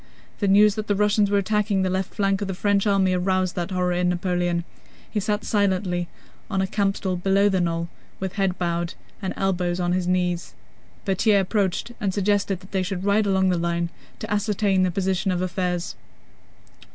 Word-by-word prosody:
The 205 - +1
news 205 +2 +6
that 215 0 -4
the 205 - +2
Russians 210 0 +3
were 205 - +2
attacking 205 -1 +1
the 185 - +1
left 190 0 -2
flank 195 0 +1
of 200 - -2
the 190 - -3
French 200 +1 +1
army 195 -2 +3
aroused 185 0 0
that 175 0 -2
horror 180 -1 0
in 180 0 +1
Napoleon. 175 -1 0 0.5
He 215 - 0
sat 210 +1 -1
silently 185 -4 0 0.4
on 195 -3 -1
a 190 - +2
campstool 195 -2 -1
below 195 +3 +3
the 190 -2 +1
knoll, 170 -1 -1 0.3
with 190 -1 -3
head 195 -2 0
bowed 170 -1 -2 0.3
and 190 - -2
elbows 180 -2 0
on 175 -1 0
his 180 -1 0
knees. 180 -1 -1 0.5
Berthier 200 +1 +3
approached 195 +2 0
and 195 -3 -1
suggested 200 -2 +1
that 185 - -15
they 190 - 0
should 185 0 -3
ride 205 +1 +2
along 190 -1 +3
the 180 -2 +1
line 170 0 -1 0.3
to - - -4
ascertain 205 -2 +1
the 185 - +3
position 190 +2 0
of 180 -1 0
affairs. 180 -1 -2
190 Hz, 190 wpm, -24 LUFS, 180-200 Hz, 0.5 s, news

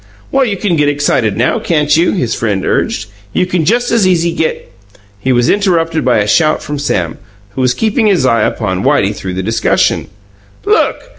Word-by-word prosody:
"Well, 270 -1 +2
you 205 -4 -2
can 180 -4 0
get 145 -1 +2
excited 130 -8 0
now, 120 - +1
can't 150 -3 +1
you?" 165 +2 +2
his 125 - -1
friend 100 -4 -2
urged. 110 - -1 0.3
"You - - +1
can 180 -3 -1
just 240 +6 +1
as 225 -5 +3
easy 170 -2 +2
get 160 - -3 0.3
" 100 0 -32
He 130 +6 -1
was 120 -1 +2
interrupted 165 -6 +1
by 125 -3 +2
a 105 -1 0
shout 155 +7 +2
from 145 -1 -5
Sam, 90 - -2 0.3
who 130 - -4
was 125 -1 +1
keeping 220 +1 +1
his 180 -10 +2
eye 115 -2 +2
upon 95 -4 -1
Whitey 100 +2 +2
throughout 95 -2 -6
the 95 - -3
discussion. 110 +4 0 0.6
"Look! 430 +4 0
145 Hz, 200 wpm, -13 LUFS, 110-180 Hz, 0.6 s, as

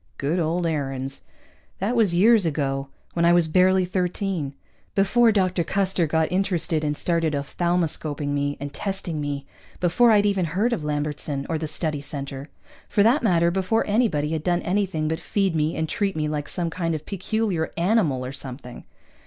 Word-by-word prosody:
_ - - -42
Good 150 +6 0
old 170 +2 0
Aarons. 135 -4 -3 0.6
That 210 +6 -1
was 220 -6 +3
years 210 +5 +5
ago, 140 -4 -1 0.3
when 170 - 0
I 170 0 +6
was 175 -2 +4
barely 185 +3 +4
thirteen. 180 -5 -2 0.4
Before 225 +4 +4
Dr. 185 -4 +1
Custer 190 -1 0
got 160 +1 +1
interested 180 -4 0
and 150 -1 -1
started 165 -3 0
ophthalmoscoping 155 -1 -1
me 145 0 -1
and 145 0 -6
testing 185 -4 -3
me, 140 -1 -3 0.3
before 180 +8 +4
I'd 210 -2 +5
ever 200 -2 +2
heard 195 +9 0
of 200 - -3
Lambertson 145 -1 -2
or 160 -1 -1
the 155 - -3
Study 155 -1 -1
Center. 140 -1 -6 0.4
For 205 - +3
that 240 +8 +4
matter, 170 -6 +3
before 190 +5 +1
anybody 205 -9 +1
had 160 -1 -1
done 175 -1 +1
anything 185 -5 0
but 160 +1 -1
feed 195 -4 0
me 155 +1 0
and 160 - -1
treat 200 -1 -1
me 155 -1 -1
like 150 -1 -3
some 170 -2 -2
kind 165 -1 -1
of 155 0 -6
peculiar 195 -3 -1
animal 170 - +2
or 130 - -5
something. 130 -2 -8
170 Hz, 180 wpm, -24 LUFS, 150-190 Hz, 0.6 s, I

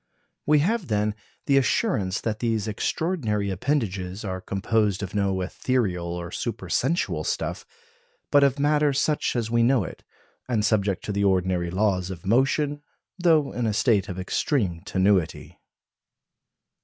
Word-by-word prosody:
We 150 0 +5
have, 215 -3 0
then, 105 0 0 0.3
the 140 - +3
assurance 110 - 0
that 110 -2 -2
these 115 -3 -1
extraordinary 110 - -1
appendages 95 -4 -2
are 95 -1 -4
composed 100 +1 0
of 100 - -6
no 100 -2 0
ethereal 95 -3 -1
or 85 0 -5
supersensual 170 +2 -1
stuff, - - -3 0.6
but 145 -1 +6
of 140 0 +3
matter 145 0 +2
such 145 +1 0
as 115 -2 -1
we 120 0 +3
know 120 -1 +3
it, - - -9 0.5
and 110 -4 +1
subject 100 -3 +1
to - - -3
the 100 0 0
ordinary 90 -2 +1
laws 95 -1 0
of 90 -2 -8
motion, 140 +6 +1 0.4
though 160 -5 +3
in 120 -2 -2
a 110 - 0
state 105 -3 +2
of 90 - -5
extreme 95 - -1
tenuity. 95 -3 0
105 Hz, 145 wpm, -25 LUFS, 95-135 Hz, 0.6 s, but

